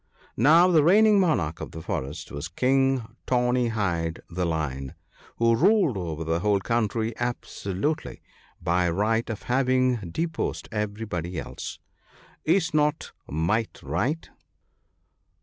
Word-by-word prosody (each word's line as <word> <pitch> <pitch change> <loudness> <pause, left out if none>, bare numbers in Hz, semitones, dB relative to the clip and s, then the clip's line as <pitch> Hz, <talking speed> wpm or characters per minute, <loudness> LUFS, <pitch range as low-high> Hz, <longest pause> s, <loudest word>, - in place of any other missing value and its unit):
Now, 160 - +6
the 160 -4 +5
reigning 210 +5 +6
monarch 100 - +1
of - - -7
the 80 - -7
forest 70 -1 -4
was 70 +2 -5
King 135 +6 +2 0.2
Tawny 125 -1 +2
hide 85 -7 -1
the 90 +1 -1
Lion, 70 -5 -3 0.4
who 115 0 +3
ruled 185 - +3
over 80 -4 -4
the 80 +1 0
whole 100 +1 +2
country 115 +2 -1
absolutely, 120 - -3 0.4
by 90 +1 +1
right 110 +7 0
of 110 - -5
having 130 0 +2
deposed 160 - -3
everybody 105 -5 -3
else. - - -7 0.7
Is 165 0 +2
not 150 0 +1 0.2
might 105 +9 -1
right? 120 - -1
115 Hz, 120 wpm, -26 LUFS, 85-135 Hz, 0.7 s, Now